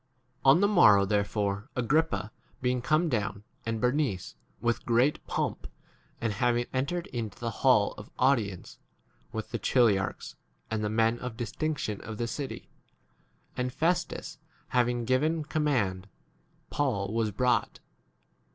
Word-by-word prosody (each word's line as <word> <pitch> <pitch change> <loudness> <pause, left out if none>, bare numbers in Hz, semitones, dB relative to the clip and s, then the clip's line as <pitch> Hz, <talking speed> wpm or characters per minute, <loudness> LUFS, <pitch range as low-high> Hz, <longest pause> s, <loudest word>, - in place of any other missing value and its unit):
23 135 - +4
On - - +2
the 200 - +5
morrow 105 - +6
therefore, 100 +2 -1
Agrippa 135 -2 +1 0.3
being 125 -1 0
come, 120 - 0 0.2
and 115 -1 -1
Bernice, 125 -5 0 0.3
with 120 0 0
great 120 +5 +2
pomp, - - -2 0.5
and 115 -2 -1
having 120 +3 +1
entered 140 +7 -1
into 115 -5 -4
the 115 -1 -3
hall 125 -6 +4
of 105 - -11
audience, 115 -9 0 0.5
with - - -5
the - - -2
chili 120 -6 +4
archs 95 - -5 0.4
and 110 -1 -1
the 105 - 0
men 115 +2 +2
of 125 -2 -6
distinction 120 -2 -3
of 110 -2 -7
the 120 - -1
city, 135 +3 -5 0.9
and 125 0 -1
Festus 170 +4 -1 0.3
having 120 -1 +1
given 150 +6 +1
command, 125 - 0 0.6
Paul 110 -8 -1
was 115 -1 +1
brought. 125 +5 0
120 Hz, 135 wpm, -29 LUFS, 105-135 Hz, 0.9 s, morrow